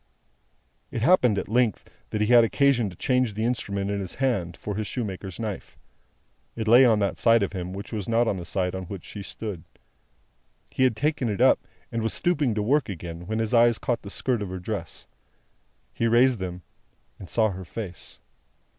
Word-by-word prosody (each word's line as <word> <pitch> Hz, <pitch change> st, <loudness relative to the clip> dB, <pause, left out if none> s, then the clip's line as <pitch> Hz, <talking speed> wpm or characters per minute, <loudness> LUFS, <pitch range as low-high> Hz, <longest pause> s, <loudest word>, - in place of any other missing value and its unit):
It 115 Hz, -, -3 dB
happened, 125 Hz, -, +4 dB
at -, -, -2 dB
length, 115 Hz, -2 st, +1 dB, 0.2 s
that 105 Hz, -, -2 dB
he -, -, +3 dB
had 120 Hz, -1 st, +8 dB
occasion 120 Hz, -2 st, +2 dB
to 90 Hz, -, -12 dB
change 125 Hz, -5 st, +1 dB
the 110 Hz, +1 st, -1 dB
instrument 100 Hz, -5 st, -2 dB
in 100 Hz, -, -1 dB
his 95 Hz, -4 st, -5 dB
hand, 100 Hz, -11 st, -1 dB
for 105 Hz, -, -5 dB
his 105 Hz, 0 st, -3 dB
shoemaker's 95 Hz, -5 st, -5 dB
knife. 110 Hz, -4 st, -5 dB, 0.8 s
It 110 Hz, -1 st, -3 dB
lay 120 Hz, +4 st, +8 dB
on 115 Hz, -3 st, +4 dB
that 100 Hz, -1 st, -1 dB
side 115 Hz, -2 st, +4 dB
of 100 Hz, -, -3 dB
him 90 Hz, -1 st, -4 dB
which 100 Hz, +4 st, -7 dB
was 105 Hz, -1 st, -4 dB
not 115 Hz, +1 st, +3 dB
the 90 Hz, -, -5 dB
side 90 Hz, +1 st, -1 dB
on 95 Hz, -1 st, -5 dB
which 95 Hz, 0 st, -8 dB
she 105 Hz, -, -8 dB
stood. 100 Hz, -4 st, -6 dB, 1.1 s
He 130 Hz, -, +2 dB
had 125 Hz, -4 st, +2 dB
taken 145 Hz, -1 st, 0 dB
it 100 Hz, -, -2 dB
up, -, -, +5 dB, 0.3 s
and 115 Hz, -, -2 dB
was 115 Hz, -, -1 dB
stooping 145 Hz, -10 st, +1 dB
to 105 Hz, -, 0 dB
work 140 Hz, +3 st, +2 dB
again, 85 Hz, -1 st, -7 dB
when 110 Hz, +2 st, -2 dB
his 110 Hz, 0 st, -1 dB
eyes 120 Hz, -1 st, +5 dB
caught 120 Hz, -, -2 dB
the 100 Hz, -, -9 dB
skirt 120 Hz, +2 st, -1 dB
of 100 Hz, -, -4 dB
her 95 Hz, -, -5 dB
dress. 90 Hz, -1 st, -6 dB, 0.9 s
He 115 Hz, -, 0 dB
raised 120 Hz, +1 st, +4 dB
them, 90 Hz, -1 st, -5 dB, 0.6 s
and 95 Hz, -, -10 dB
saw 110 Hz, -2 st, +2 dB
her 95 Hz, 0 st, -7 dB
face. 90 Hz, 0 st, -8 dB
110 Hz, 200 wpm, -25 LUFS, 95-120 Hz, 1.1 s, had